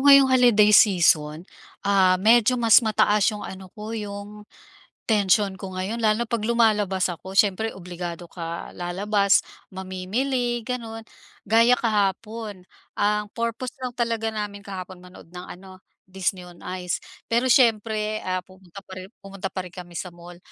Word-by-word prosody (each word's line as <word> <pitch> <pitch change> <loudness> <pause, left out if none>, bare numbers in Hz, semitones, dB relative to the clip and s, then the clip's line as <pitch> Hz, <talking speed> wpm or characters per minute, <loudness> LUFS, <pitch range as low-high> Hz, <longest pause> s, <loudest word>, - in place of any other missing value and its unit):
ngayong 275 -1 +8
holiday 240 -5 +5
season, 165 -5 +4 0.4
ah, 190 -2 +4
medyo 230 +4 +4
mas 230 0 +6
mataas 210 -1 +2
yung 210 -1 -7
ano 190 -1 -10
ko, 215 +1 -7
yung 210 -1 -7 0.7
tensiyon 200 -2 +2
ko 190 0 -8
ngayon, 190 +5 -3
lalo 220 0 +1
na - - -10
'pag 230 -2 -1
lumalabas 210 -5 +2
ako. 180 +2 -8
Siyempre 210 +2 +2
obligado 175 -2 -7
ka 170 -1 -6
lalabas, 200 +3 +2 0.3
mamimili 235 +7 -2
gano'n. 225 -1 -5 0.5
Gaya 230 +3 +5
kahapon, 215 -2 -1 0.3
ang 210 0 0
purpose 235 +2 -3
lang 255 - -2
talaga 230 -2 -1
namin 210 -2 -5
kahapon, 185 -2 -8
manood 180 -1 -15
ng 180 0 -8
ano, 185 0 -12 0.2
Disney 185 -1 -3
On 175 -1 -15 0.2
Ice. 180 -1 -3 0.2
Pero 240 +3 +1
siyempre, 215 -3 +2
ah, 185 0 -2
pumunta 185 0 -14
pa 190 - -11
rin 185 - -11
pumunta 195 0 -6
pa 185 -1 -5
rin 180 - -12
kami 175 -2 -9
sa 180 -2 -6
mall. 175 0 -13
205 Hz, 150 wpm, -24 LUFS, 185-225 Hz, 0.7 s, ngayong